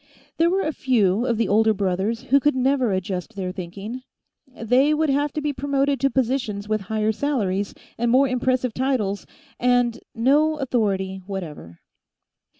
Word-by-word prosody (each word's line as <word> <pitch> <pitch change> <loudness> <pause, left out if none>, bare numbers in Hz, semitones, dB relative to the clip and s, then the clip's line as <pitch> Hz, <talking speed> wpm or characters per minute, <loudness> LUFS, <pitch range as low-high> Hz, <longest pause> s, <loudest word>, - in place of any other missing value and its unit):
There 330 +1 +4
were 385 +2 +1
a 310 - -1
few 230 -4 +1
of 235 - +1
the 230 -2 +1
older 220 +2 +3
brothers 195 +4 -1
who 280 - +7
could 295 0 +2
never 260 -2 +2
adjust 190 +2 -3
their 185 -2 -3
thinking; 195 +7 -7 0.5
they 260 +4 +2
would 310 -1 +1
have 290 +1 +1
to 305 - -2
be 295 0 -1
promoted 280 0 0
to 275 - +2
positions 235 -5 -1
with 215 -1 0
higher 220 0 +1
salaries 205 -7 -1 0.2
and 235 0 +1
more 265 +3 +4
impressive 255 -1 0
titles 245 -7 -1 0.3
and 245 -1 +2 0.2
no 295 +6 +3
authority 195 -8 -1
whatever. 155 - -7
240 Hz, 155 wpm, -23 LUFS, 200-275 Hz, 0.5 s, who